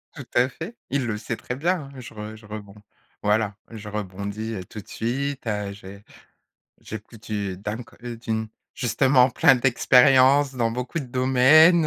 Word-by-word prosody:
Tout 145 -5 -8
à 125 +2 +3
fait, 215 - -8
il 140 -2 0
le 110 -3 -2
sait 110 +2 -4
très 125 - -5
bien, 170 +5 0
hein. 130 - -10
Je 125 - -10
re 110 0 -7
je 110 -1 -15
rebond 105 -1 -9 0.5
voilà, 105 0 +1
je 110 -2 -8
rebondis, 100 +2 -4
heu, 95 -4 -5
tout 105 - -10
de 100 - -13
suite, 135 +4 -3
heu. 105 -2 -2
J'ai 100 0 -12 0.8
j'écoute 110 +1 -10
une, 100 -3 -2
dam 105 +5 -5
qu 120 0 -9
d'une 110 -1 -2 0.3
justement 125 +2 +3
plein 135 +2 +5
d'expériences 130 +2 +5
dans 115 -2 +1
beaucoup 125 +7 -3
de 145 - -4
domaines. 135 +7 +5
115 Hz, 170 wpm, -24 LUFS, 105-130 Hz, 0.8 s, plein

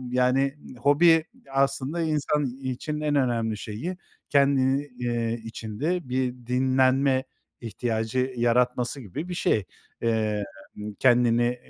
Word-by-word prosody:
Yani, 130 +2 +2 0.2
hobi 155 +5 +5 0.3
aslında 135 +3 0
insan 150 -1 0 0.2
için 130 +4 -3
en 150 -1 0
önemli 115 -5 +1
şeyi, 115 - -5 0.3
ken 140 -1 +4 0.4
iii, 120 -1 -1
içinde 120 +9 -3
bir 125 0 0
dinlenme 130 +1 +2 0.4
ihtiyacı 115 +2 -2
yaratması 125 +2 +1
gibi 135 - -6
bir 180 - -4
şey. 110 - +1 0.4
Emm, 110 -3 0 0.5
kendini 120 -1 +3
130 Hz, 105 wpm, -26 LUFS, 120-140 Hz, 0.5 s, hobi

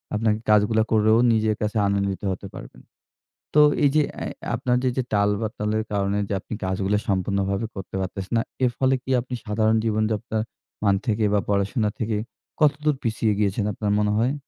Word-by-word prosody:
আপনাকে 110 0 +1
কাজগুলা 105 +1 +4
করেও 110 0 +4 0.2
নিজের 110 -1 +1
কাছে 105 +1 -1
আনন্দিত 100 -1 -1
হতে 95 +2 -5
পারবেন। - - -11 0.7
তো 150 - +8 0.2
এই 145 - +6
যে 155 - +5 0.2
অ্যা - - -4 0.3
আপনার 125 -1 +1
যে 130 - +3
যে 130 - +1
টাল 100 0 +3
বাতালের 110 -1 -2
কারণে 100 0 0
যে - - -1
আপনি - - -8
কাজগুলো 95 +2 0
সম্পূর্ণভাবে 100 +2 0
করতে 95 -1 -7
পারতেছেন 95 +2 -5
না। - - +3 0.2
এর 125 - +3
ফলে 135 0 +3
কি - - -10
আপনি 125 +1 -9
সাধারণ 110 +1 +2
জীবনযাত্রার 110 0 0 0.4
মান 100 -2 +4
থেকে 110 -1 +1
বা 105 - +4
পড়াশোনা 105 +3 +1
থেকে 110 -1 -1 0.4
কতদূর 150 0 +3
পিছিয়ে 110 -1 +1
গিয়েছেন 100 0 +1
আপনার 105 +1 -2
মনে 105 0 +1
হয়? 120 +5 +2
105 Hz, 175 wpm, -24 LUFS, 100-115 Hz, 0.7 s, তো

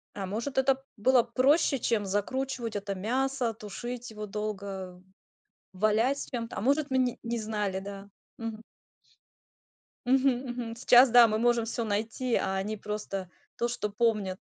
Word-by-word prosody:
А, 195 - -3
может, 230 +8 -4
это 265 0 +2
было 245 +3 +4
проще, 270 +4 +3
чем 225 -3 0
закручивать 230 +4 -2
это 200 -1 -3
мясо, 250 +3 0
тушить 240 +3 -7
его 210 -1 -6
долго, 195 -3 -5 0.7
валять 215 +8 +2
с - - -6
чем-то. 230 -5 -5
А - - -2
может, 280 +5 +2
мы 260 - +2
ни 250 -2 +1
не 235 0 -2
знали, 210 -3 -2
да. 200 0 -8 0.3
Мгм. 225 -1 -5 1.4
Мгм 265 +2 +4 0.2
мгм. 235 -2 -5
Сейчас 245 +1 +6
да, 240 0 +8
мы 215 0 0
можем 235 -1 +2
всё 235 +1 -2
найти, 225 +4 -1
а 190 0 0
они 210 +3 -3
просто 200 -3 -5 0.3
то, 235 - +1
что 240 -3 -3
помнят. 205 -4 0
225 Hz, 155 wpm, -29 LUFS, 205-250 Hz, 1.4 s, да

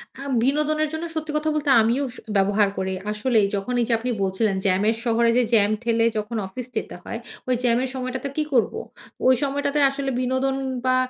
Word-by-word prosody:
আ - - -13 0.2
বিনোদনের 300 +3 +1
জন্য 320 +1 -3
সত্যি 310 -1 -3
কথা 310 +1 -1
বলতে 295 -1 -1
আমিও 235 +5 +1
স - - -12 0.2
ব্যবহার 200 +1 +3
করি। 190 0 -2 0.2
আসলেই 215 0 +2
যখন 200 +5 -3
এই - - +1
যে - - +3
আপনি 250 +2 -3
বলছিলেন 195 +2 0
জ্যামের 200 +4 +2
শহরে 235 -1 +2
যে 250 - +4
জ্যাম 210 -2 +5
ঠেলে 230 -1 +2
যখন 215 +2 -3
অফিস 245 +6 -7
যেতে - - -4
হয়, - - -5 0.3
ঐ - - -4
জ্যামের 245 +1 +2
সময়টাতে 255 +1 -3
কি 305 - +2
করবো? 255 - +2 0.5
ঐ - - +6 0.2
সময়টাতে 285 +1 0
আসলে 275 0 -3
বিনোদন 260 +1 0 0.3
বা 255 0 +3
250 Hz, 190 wpm, -23 LUFS, 215-275 Hz, 0.5 s, ঐ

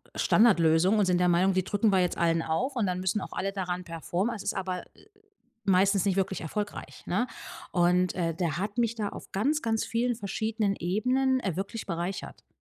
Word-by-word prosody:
Standardlösung 185 -2 +4
und 205 - +3
sind 180 -1 +2
der 180 - +3
Meinung, 185 +3 +3
die 185 -1 +1
drücken 205 +2 +1
wir 190 - +4
jetzt 180 -1 0
allen 165 -1 +2
auf, 255 - -1
und 225 -4 +1
dann 180 0 -1
müssen 190 +2 0
auch - - -7
alle 195 +1 -2
daran 180 -2 -3
performen. 175 - -2
Es 200 - -7
ist - - -1
aber, 185 -1 -3
äh, - - -20 0.6
meistens 195 +1 +3
nicht 195 -1 +1
wirklich 190 0 0
erfolgreich, 205 +6 -5
ne? 210 +8 0 0.5
Und, 180 0 +3
äh, 165 -3 -1
der 170 -3 -1
hat 205 +4 -4
mich 230 -1 +2
da 210 -3 -2
auf - - -11
ganz, 285 +10 +1
ganz 225 -1 0
vielen 240 +1 0
verschiedenen 215 0 -1
Ebenen, 255 +8 +1
äh, 185 -7 -2
wirklich 200 +3 -4
bereichert. 175 +1 -5
195 Hz, 200 wpm, -28 LUFS, 180-215 Hz, 0.6 s, Standardlösung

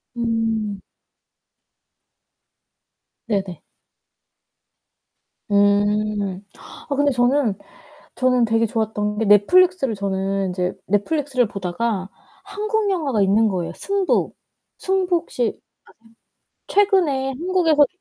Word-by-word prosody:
음. 225 -3 -1 2.5
네네. 195 -5 -3 1.9
음. 205 -1 +1 0.5
아 280 - -1
근데 285 0 +2
저는 245 -3 +1 0.6
저는 250 -2 +2
되게 225 0 +2
좋았던 210 -2 -2
게 225 - 0
넷플릭스를 270 - +4
저는 195 -1 -2
이제 180 0 -2
넷플릭스를 255 +4 0
보다가 195 +1 -3 0.4
한국 420 +1 -2
영화가 280 - 0
있는 210 +3 +3
거예, 180 -4 -2
요 - - -7
승부. 395 -1 0 0.5
승부 375 -2 +1
혹시 255 -6 -4
아세요? - - -8 1.1
최근에 355 -10 +2
한국에서 320 0 +2
225 Hz, 200 characters per minute, -21 LUFS, 205-300 Hz, 2.5 s, 넷플릭스를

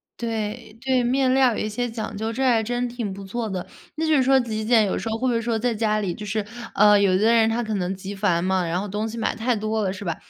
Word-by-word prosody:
对， 225 -1 -4
对 255 0 +1
面 255 +1 +2
料 260 -2 +4
有 - - -4
一 - - -1
些 245 +3 -2
讲 225 -1 -5
究， 220 +2 -3
这 255 - -4
还 230 -3 +3
真 245 +2 -1
挺 235 -5 -4
不 195 0 -9
错 220 +2 -3
的。 185 -2 -4 0.3
那 320 - -1
就 315 - +4
是 265 - +4
说 265 +1 +5
极 220 -3 -3
简 225 -1 +4
有 190 - -1
时 225 - -4
候 220 - -1
会 255 +2 -1
不 245 - +2
会 230 - 0
说 230 -1 -1
在 240 0 0
家 215 -1 +1
里， 190 -4 -2
就 210 - -8
是， 210 0 -2 0.3
呃， 210 0 +6
有 200 -2 +3
的 220 +3 +3
人 225 -1 +4
他 230 +2 0
可 220 -2 -3
能 185 -2 -1
极 195 +1 -7
繁 190 -4 +1
嘛， 185 0 +1
然 170 +2 -1
后 205 - -4
东 210 +3 -2
西 225 +1 -7
买 225 - -1
太 240 +2 0
多 215 0 -1
了， 190 - 0
是 195 +1 -8
吧？ 170 -2 -1
220 Hz, 315 characters per minute, -23 LUFS, 205-240 Hz, 0.3 s, 呃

